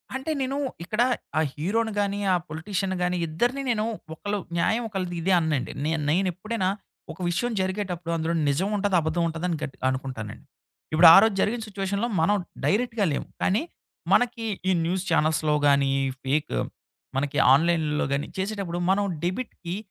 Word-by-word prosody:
అంటే, 265 +4 -3
నేను 265 +1 -1 0.3
ఇక్కడ 215 +6 -1 0.4
ఆ - - +4
హీరోని 220 +9 0
గాని, 200 0 0
ఆ - - +5
పొలిటీషియన్‌ని 185 +4 -2
గాని 180 0 0
ఇద్దరిని 240 - 0
నేను 215 -2 0 0.3
ఒకళ్ళ 205 +6 -3 0.2
న్యాయం 220 +7 +1
ఒకళ్ళది 185 -4 -3
ఇదే 190 +3 +2
అననండి. 155 -5 -1
నే 155 - +1 0.2
నేనెప్పుడైనా 185 +4 0 0.4
ఒక 160 - -12
విషయం 240 +8 -1
జరిగేటప్పుడు 185 -3 -3
అందులో 165 +1 -1 0.2
నిజం 180 +8 0
ఉంటది, 200 -1 +1
అబద్ధం 160 +2 0
ఉంటది 165 +1 -4
అని 165 - -1
గట్ 145 -3 -5
అనుకుంటానండి. 130 -5 -5 0.5
ఇప్పుడు 165 +2 +8
ఆ - - +10
రోజు 220 -2 +2
జరిగిన 230 +2 0
సిచ్యువేషన్‌లో 200 +2 -2
మనం 205 +6 +3 0.3
డైరెక్ట్‌గా 225 -1 +1
లేము. 140 - -3 0.2
కానీ, 200 +4 +2 0.5
మనకి 235 -2 +2 0.2
ఈ - - +4
న్యూస్ 180 +2 -1
ఛానెల్స్‌లో 155 -2 +2
గాని, 140 -1 +4 0.3
ఫేక్, 145 +3 0 0.6
మనకి 145 +1 -1 0.2
ఆన్‌లైన్‌లో 155 0 +2
గాని 140 +1 -1
చేసేటప్పుడు 190 -3 -3
మనం 200 +1 +2 0.2
డెబిట్‌కి 185 -3 -4
180 Hz, 150 wpm, -25 LUFS, 160-205 Hz, 0.6 s, ఆ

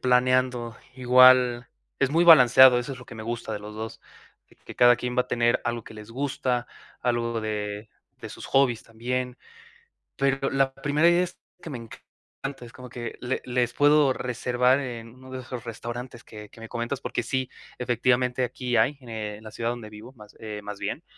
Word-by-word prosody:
planeando, 125 -1 +1 0.2
igual 125 -1 +5 0.3
es 135 - +1
muy 170 +3 +3
balanceado. 130 -5 +8
Eso 125 +3 -4
es 130 - -9
lo 125 - -12
que 120 - -12
me 110 - -8
gusta 115 -1 -4
de 105 - -3
los 105 +1 -10
2, 110 +1 -7 0.5
que - - -24
que - - -12
cada 120 0 +6
quien 125 0 -4
va 125 - +4
a 125 - -22
tener 120 0 +2
algo 120 -1 -3
que - - -12
les 105 +1 -11
gusta, 125 -2 -2 0.3
algo 115 -1 -1
de 105 0 -4 0.3
de - - -7
sus - - -9
hobbies 130 -4 +2
también. 125 +2 -4 0.8
Pero 135 0 0
la 135 -1 +1
primera 150 +4 +2
idea 175 +1 +4
es 180 - -5 0.2
que 165 - -8
me 125 - -5
encanta, 135 +3 -10
es 115 - -14
como 125 +1 -11
que 120 -1 -7
le 125 +1 -2
les 125 -1 0
puedo 145 -1 +4
reservar 125 +2 +1
en 115 -3 -7
uno 130 0 -14
de 130 0 -6
esos 125 -2 -8
restaurantes 120 +1 -7
que 105 -1 -11
que 115 - -17
me 115 - -9
comentas 120 +3 -4
porque 120 - -3
sí, 130 +2 -2 0.3
efectivamente, 125 +1 +1
aquí 125 0 -2
hay 130 +6 +2
en 110 -3 -7
la 110 - -8
ciudad 115 +2 -3
donde 115 -3 -7
vivo 110 +4 -12
más, 105 -4 -15
eh, 105 -2 -6
más 105 0 -7
bien. - - -4
125 Hz, 195 wpm, -25 LUFS, 115-130 Hz, 0.8 s, balanceado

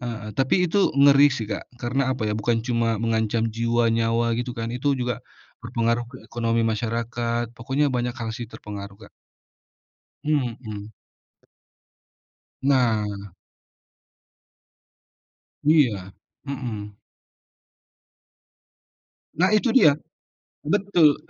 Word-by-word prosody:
heeh, 115 -4 -5
tapi 135 - +2
itu 190 +3 +3
ngeri 140 0 +7
sih 135 -5 -3
Kak 105 -1 -5
karena 125 +3 -1
apa 110 - -3
ya 105 - 0
bukan 115 +1 0
cuma 115 -2 +1
mengancam 110 0 0
jiwa 115 +1 +1
nyawa 115 +1 +1
gitu 120 +1 -3
kan 115 0 -3
itu 135 +3 0
juga, 125 -2 -2 0.4
berpengaruh 115 0 -1
ke 130 - -11
ekonomi 115 -1 0
masyarakat 115 +1 -2
pokoknya 135 +4 0
banyak 125 0 -1
hal 115 -1 -4
sih 120 0 -6
terpengaruh 100 -3 -8
Kak. 100 -1 -15 1.2
Mhm. 115 -7 -2 1.7
Nah. 105 -7 +1 2.3
Iya, 125 - +3 0.3
mhm. 120 -7 -5 2.5
Nah 185 +2 +5
itu 215 +2 +2
dia, 155 - +6 0.7
betul 175 -5 +4
120 Hz, 100 wpm, -24 LUFS, 110-135 Hz, 2.5 s, ngeri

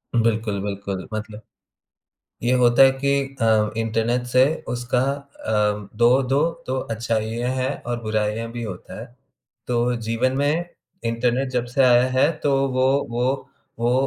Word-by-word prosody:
उ - - +4
बिल्कुल, 110 -3 0
बिल्कुल। 100 -2 -4
मतलब 110 0 -6 1.0
ये 120 +2 +1
होता 120 +1 +5
है 135 - +8
कि 140 0 +2 0.3
अ, 110 -1 +3
इंटरनेट 115 +2 0
से 130 0 +7 0.2
उसका 120 0 -1 0.5
अ, 105 -2 0
दो 120 +1 +7
दो 135 +2 +1 0.3
दो 130 +1 -1 0.2
अच्छाइयाँ 115 +1 -2
हैं 130 +1 0 0.2
और 120 -1 -2
बुराइयाँ 110 +1 -1
भी 120 0 -5
होता 95 -5 -7
हैं। 115 - -8 0.6
तो 120 -1 0 0.3
जीवन 115 +3 0
में 145 +5 +1 0.4
इंटरनेट 120 +3 0
जब 125 -2 0
से 135 - +4
आया 125 -1 +6
है 130 - +4
तो 140 -1 +3 0.2
वो 130 0 +3 0.2
वो 120 +1 0 0.5
वो 120 +1 +1
120 Hz, 150 wpm, -22 LUFS, 110-125 Hz, 1.0 s, है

